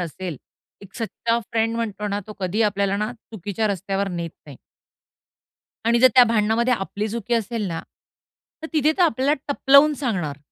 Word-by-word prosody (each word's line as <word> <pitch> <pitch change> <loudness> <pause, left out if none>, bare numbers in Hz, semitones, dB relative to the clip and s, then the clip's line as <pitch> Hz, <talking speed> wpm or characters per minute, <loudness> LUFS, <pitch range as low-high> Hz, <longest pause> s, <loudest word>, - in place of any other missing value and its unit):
असेल, 175 -1 -5 0.4
एक 195 -1 -15
सच्चा 230 0 -1
फ्रेंड 225 0 +1
म्हणतो 210 -2 -3
ना, 200 +1 -2
तो 215 - -8
कधीही 195 +5 0
आपल्याला 200 -1 +1
ना 215 +3 -2
चुकीच्या 215 -1 -4
रस्त्यावर 195 0 -2
नेत 170 -2 -4 0.2
नाही. 140 -3 -11 1.3
आणि 235 0 +4
जर 255 +1 +7
त्या 250 -1 +9
भांडणामध्ये 230 +2 +2
आपली 205 +1 -4
चुकी 235 +1 -2
असेल 225 -1 -1
ना, 165 -1 -3 0.8
तर - - -4
तिथे 310 0 +3
तर - - +5
आपल्याला 285 -1 +2
टपलावून 280 +2 +5
सांगणार 185 - -3
215 Hz, 160 wpm, -23 LUFS, 195-235 Hz, 1.3 s, त्या